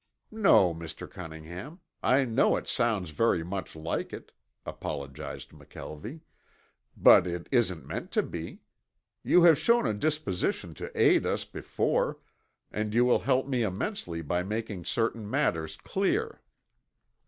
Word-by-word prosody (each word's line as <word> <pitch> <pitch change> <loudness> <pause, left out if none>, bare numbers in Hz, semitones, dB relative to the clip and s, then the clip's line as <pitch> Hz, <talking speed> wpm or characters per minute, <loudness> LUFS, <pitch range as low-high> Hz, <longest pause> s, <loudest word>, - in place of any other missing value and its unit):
"No, 195 - +5
Mr. 80 0 -7
Cunningham. 85 - -9 0.2
I 135 +1 +3
know 115 +1 +3
it - - -4
sounds 110 -9 0
very 90 0 +2
much 90 -1 -5
like 80 +1 -3
it," - - -9 0.3
apologized 70 -1 -6
McKelvie, 110 - -9 0.8
"but 90 - +7
it 85 -1 -4
isn't 110 - +1
meant - - -5
to - - +3
be. 85 -1 -7 0.6
You 180 - +5
have 165 -4 +7
shown 235 +8 +3
a - - +1
disposition 125 -5 -1
to - - -7
aid - - +5
us - - -1
before, - - -1 0.5
and 105 +1 -2
you 120 +1 +5
will 125 - +4
help 130 0 +1
me 130 -3 0
immensely 95 - -3
by 90 +4 0
making 105 -2 -4
certain 115 -2 -1
matters 90 - 0
clear. 420 - -1
105 Hz, 135 wpm, -29 LUFS, 85-135 Hz, 0.8 s, but